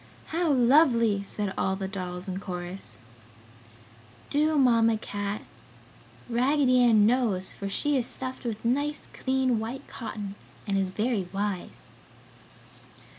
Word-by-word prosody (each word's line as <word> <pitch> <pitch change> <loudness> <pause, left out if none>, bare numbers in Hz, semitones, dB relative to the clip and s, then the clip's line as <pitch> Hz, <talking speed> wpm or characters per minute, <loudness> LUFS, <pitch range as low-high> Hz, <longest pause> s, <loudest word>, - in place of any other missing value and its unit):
"How 335 +1 0
lovely!" 240 -5 +4
said 200 0 -4
all 190 - +1
the 190 0 -4
dolls 185 -1 -5
in 190 0 -3
chorus. 180 -5 -7 1.3
"Do, 305 +1 +2
Mamma 230 -4 +4
Cat! 205 -1 -4 0.8
Raggedy 255 +2 +3
Ann 220 -4 +6
knows, 220 -6 +1
for 200 - -5
she 290 +7 +1
is 245 -2 0
stuffed 260 0 -4
with 230 -2 -4
nice 285 +5 0
clean 260 -3 +1
white 230 +5 -5
cotton 210 -4 -6 0.3
and 200 -2 -1
is 195 -1 +1
very 210 0 -1
wise!" 200 -2 -4
225 Hz, 125 wpm, -27 LUFS, 195-260 Hz, 1.3 s, Ann